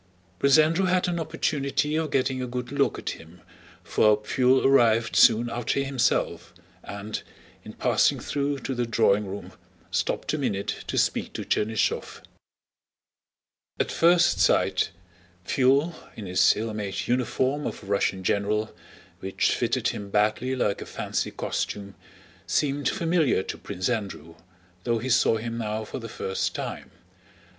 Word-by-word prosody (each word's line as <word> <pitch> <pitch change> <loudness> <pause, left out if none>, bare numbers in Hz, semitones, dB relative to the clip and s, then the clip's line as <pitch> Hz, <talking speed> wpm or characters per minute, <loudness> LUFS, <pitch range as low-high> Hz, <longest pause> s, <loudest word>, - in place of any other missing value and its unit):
Prince 140 +5 +5
Andrew 165 +5 +3
had 185 0 +2
an 175 -1 -1
opportunity 150 -1 -1
of 160 -1 0
getting 130 -1 0
a 125 - -3
good 125 0 -5
look 140 -4 +1
at - - -4
him, 80 +2 -12 0.4
for 105 -1 +3
Pfuel 125 +5 +2
arrived 115 -4 +4
soon 115 +1 +6
after 120 +3 -1
himself 135 -3 -1 0.3
and, 100 +1 -5 0.4
in - - -10
passing - - +2
through 145 0 -2
to 135 - -3
the 120 -1 -1
drawing 105 -3 +2
room, 100 +2 -7 0.4
stopped - - -1
a 155 - -1
minute 105 -8 -2
to - - -3
speak - - 0
to - - -5
Chernýshev. 110 0 -1 1.6
At - - 0
first 170 +1 +4
sight, - - +3 0.6
Pfuel, 140 +6 +2 0.2
in 105 - -7
his 90 0 +4
ill 110 +1 -3
made 100 -2 -4
uniform 130 +3 0
of - - -6
a - - -11
Russian 100 -1 0
general, 105 +3 0 0.4
which 95 0 0
fitted - - 0
him 100 -1 -6
badly 105 +6 +1
like 105 -5 0
a - - -7
fancy - - -3
costume, 100 -1 -4 0.5
seemed 145 -2 +1
familiar 165 - +1
to - - -5
Prince 90 0 -4
Andrew, 100 -9 -4 0.5
though 120 -1 +1
he 120 +4 -4
saw 115 -2 +4
him 115 +1 -4
now 110 -1 -2
for 130 - -6
the 115 -1 -8
first 95 -2 -3
time. - - -5
120 Hz, 150 wpm, -26 LUFS, 105-140 Hz, 1.6 s, soon